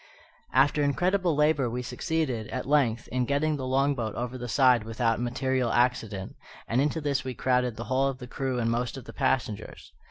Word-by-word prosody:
After 140 +3 +3
incredible 175 +4 +1
labour 150 -4 +2
we 125 +2 -3
succeeded, 130 -4 -2
at 130 - -4
length, 125 -5 +2
in 125 0 0
getting 145 +3 +1
the 130 -3 -4
long 135 +2 +2
boat 115 -5 -4
over 125 +1 -4
the 125 -1 -5
side 125 -2 +4
without 115 +1 0
material 125 0 0
accident, 120 -6 0 0.3
and 120 +3 +2
into 150 +3 0
this 140 -2 0
we 130 -1 -5
crowded 125 -1 +1
the 115 - -5
whole 130 +2 +1
of 135 -1 -3
the 125 - -8
crew 130 0 -3
and 115 -1 0
most 120 +3 -2
of 130 - -9
the - - -10
passengers. 130 -6 -2
130 Hz, 195 wpm, -27 LUFS, 120-140 Hz, 0.3 s, side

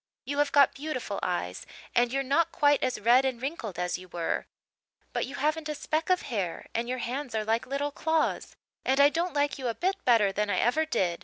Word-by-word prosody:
You 285 +1 -2
have 290 -1 +2
got 280 -1 +5
beautiful 265 -8 -4
eyes 95 - -2 0.3
and 240 0 +3
you're 275 +1 0
not 285 +5 +2
quite 290 -1 +3
as 255 - -1
red 240 +5 +5
and 260 -3 -1
wrinkled 255 - -4
as 180 0 -1
you 185 - -12
were 170 -1 -2 0.7
but - - -1
you 270 - -7
haven't 310 +2 -1
a 300 - -2
speck 310 +3 -2
of 365 -1 +3
hair 200 - -3
and 235 +1 -2
your 255 - -1
hands 250 +1 -4
are 215 -1 -1
like 225 +2 0
little 280 +2 -2
claws 320 +2 -1 0.3
and 265 +1 +1
I 285 0 +8
don't 335 +2 -2
like 285 -1 +1
you 255 - -2
a 230 - -1
bit 385 +2 -1
better 225 -5 +4
than 210 +1 -1
I 185 - +1
ever 310 +10 +2
did. 180 - 0
265 Hz, 225 wpm, -28 LUFS, 220-290 Hz, 0.7 s, I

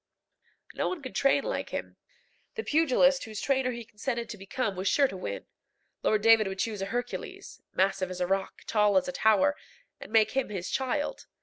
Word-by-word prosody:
No - - -1
one 350 -6 -5
could 260 - -7
train 275 0 +3
like - - -3
him. - - -5 0.6
The 450 - -3
pugilist 275 - +3
whose 215 -2 -6
trainer 265 -2 +1
he 235 -2 -5
consented 235 +2 -4
to 215 - -6
become 200 +2 -2
was 185 +2 -3
sure 280 -2 +4
to 195 - -8
win. 100 - -5 0.6
Lord 215 -1 +2
David 225 -2 +6
would 190 0 -4
choose 210 0 -2
a 195 - -2
Hercules 245 +3 -5
massive 190 0 +1
as 185 0 -6
a 180 - +1
rock, 195 +1 -2
tall 210 -3 +3
as 185 - +2
a - - -2
tower 220 +10 +3 0.4
and - - -10
make 220 -1 +4
him 270 -3 -1
his 190 -4 -4
child. 270 +3 -2
220 Hz, 195 wpm, -29 LUFS, 195-265 Hz, 0.6 s, David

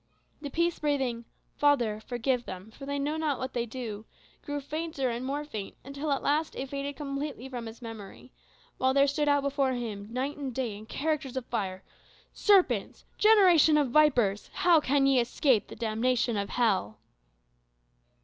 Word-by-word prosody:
The 290 - -5
peace 340 +3 0
breathing, 265 -6 -1 0.3
"Father, 245 -8 +2
forgive 245 +2 -1
them, 185 +3 -8
for 275 +4 -10
they 285 0 -2
know 290 +3 -1
not 305 -4 0
what 260 0 -5
they 240 -1 -1
do," 220 -3 -6 0.4
grew 290 -1 -3
fainter 290 -2 -3
and 235 +2 -4
more 285 +3 -3
faint, 215 -9 -6
until 280 +2 -4
at 275 - 0
last 300 +2 0
it 265 0 -5
faded 280 +1 -4
completely 275 -2 -5
from 245 -3 -6
his 225 +2 -10
memory; 225 +2 -9 0.5
while 260 +1 +2
there 280 0 +6
stood 290 +1 0
out 285 -1 +3
before 275 -2 +1
him 215 -5 -5
night 265 +4 -2
and 270 -4 -5
day, 245 -6 -2
in 215 +2 -11
characters 290 -2 -2
of 255 - -3
fire, 190 -6 -3 0.5
"Serpents, 400 -3 +2
generation 365 -8 +6
of 285 -5 +1
vipers, 245 -9 +3
how 350 -3 +5
can 280 -1 +2
ye 270 -2 +4
escape 245 -1 +2
the - - -10
damnation 235 +2 0
of 200 -1 -2
hell!" 200 - +1
265 Hz, 170 wpm, -29 LUFS, 235-290 Hz, 0.5 s, there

